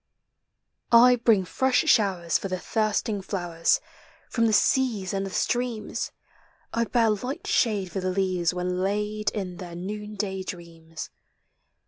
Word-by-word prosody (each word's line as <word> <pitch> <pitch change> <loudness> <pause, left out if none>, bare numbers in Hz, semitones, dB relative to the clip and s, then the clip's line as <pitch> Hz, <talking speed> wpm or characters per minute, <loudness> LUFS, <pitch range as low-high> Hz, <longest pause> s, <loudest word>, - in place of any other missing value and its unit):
I 245 +1 +8
bring 225 -5 +3
fresh 260 +6 +2
showers 180 -6 +3
for - - -4
the 185 -1 -2
thirsting 215 0 -1
flowers, 175 -4 0 0.5
From 230 -2 +2
the - - +2
seas 215 -4 +2
and 195 0 -1
the - - -5
streams; 235 +2 -2 0.6
I 230 0 +1
bear 230 -2 +2
light 250 +7 -4
shade 205 -6 +1
for 195 - -3
the 185 0 -1
leaves 185 -3 +1
when 180 0 -2
laid 210 +2 -1
In 185 -4 -5
their 175 -2 -8
noonday 205 +1 -4
dreams. 165 -3 -8
195 Hz, 135 wpm, -26 LUFS, 180-220 Hz, 0.6 s, I